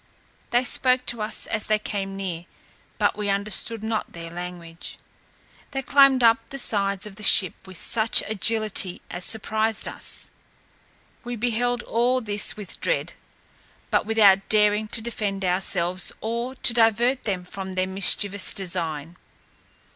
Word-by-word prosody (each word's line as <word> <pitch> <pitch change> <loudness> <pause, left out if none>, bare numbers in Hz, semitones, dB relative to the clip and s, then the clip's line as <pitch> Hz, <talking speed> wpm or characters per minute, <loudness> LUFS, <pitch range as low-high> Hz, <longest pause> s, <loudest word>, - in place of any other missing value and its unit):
They 245 +1 +2
spoke 255 0 +2
to 235 -2 -3
us 215 +1 -4
as 215 -2 -3
they 215 - +2
came 195 -2 -5
near, 175 -3 -5 0.5
but - - +1
we 210 -1 -3
understood 210 +2 0
not 220 -1 -3
their 165 -1 -9
language; 175 -1 -8 0.7
they 270 0 -4
climbed 275 -2 +4
up 230 0 +5
the 275 - -7
sides 200 -5 -1
of 210 -2 -9
the - - -10
ship 190 -3 +6
with 185 -2 -7
such 225 -1 +4
agility 215 -3 -1
as 175 0 -2
surprised 220 0 +2
us. - - -3 0.9
We 245 0 -5
beheld 245 +1 -1
all 245 +3 0
this 210 -4 -1
with 205 -3 -8
dread, - - -1 0.8
but - - +1
without 200 -3 +4
daring 210 0 +2
to 225 - -2
defend 205 -4 -3
ourselves, 180 0 -1
or 235 +3 -4
to 240 - +3
divert 235 +3 +2
them 190 -4 -2
from 190 0 -7
their 185 0 0
mischievous 195 +1 +4
design. 170 -4 -5
210 Hz, 145 wpm, -23 LUFS, 190-230 Hz, 0.9 s, ship